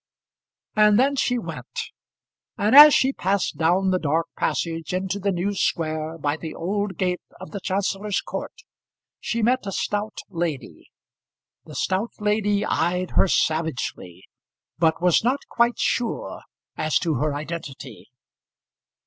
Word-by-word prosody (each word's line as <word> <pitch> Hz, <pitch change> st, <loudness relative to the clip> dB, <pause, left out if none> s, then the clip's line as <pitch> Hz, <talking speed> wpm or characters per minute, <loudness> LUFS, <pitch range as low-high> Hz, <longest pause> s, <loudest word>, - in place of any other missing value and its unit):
And 210 Hz, -1 st, +5 dB
then 275 Hz, +2 st, +3 dB
she 250 Hz, -2 st, +1 dB
went; 235 Hz, -, -6 dB, 0.8 s
and 210 Hz, +5 st, +2 dB
as 295 Hz, +1 st, +12 dB
she 265 Hz, +1 st, +3 dB
passed 190 Hz, -, -1 dB
down 180 Hz, +4 st, +2 dB
the 185 Hz, -, +1 dB
dark 160 Hz, +1 st, 0 dB
passage 165 Hz, +1 st, -2 dB
into 190 Hz, +2 st, -2 dB
the 200 Hz, 0 st, 0 dB
new 190 Hz, +3 st, -1 dB
square 160 Hz, -3 st, -1 dB
by 145 Hz, 0 st, -1 dB
the 160 Hz, -1 st, -7 dB
old 195 Hz, +1 st, -2 dB
gate 180 Hz, -1 st, -1 dB, 0.2 s
of 185 Hz, -, -10 dB
the 200 Hz, -, -5 dB
Chancellor's 195 Hz, +1 st, -1 dB
court, -, -, -7 dB, 0.6 s
she 235 Hz, -1 st, -2 dB
met 245 Hz, -1 st, +1 dB
a -, -, -2 dB
stout 205 Hz, +3 st, -3 dB
lady. 165 Hz, -, -5 dB, 0.8 s
The -, -, -11 dB
stout 195 Hz, +5 st, -1 dB
lady 210 Hz, -1 st, +1 dB
eyed 180 Hz, +2 st, 0 dB
her -, -, +3 dB
savagely, 155 Hz, -, -1 dB, 0.6 s
but 165 Hz, +1 st, +2 dB
was 180 Hz, +2 st, +4 dB
not 260 Hz, +4 st, 0 dB
quite 235 Hz, 0 st, +2 dB
sure 240 Hz, -2 st, -2 dB, 0.3 s
as 155 Hz, 0 st, +1 dB
to 165 Hz, -3 st, 0 dB
her 150 Hz, +2 st, -1 dB
identity. 145 Hz, -7 st, -7 dB
185 Hz, 140 wpm, -23 LUFS, 160-210 Hz, 0.8 s, as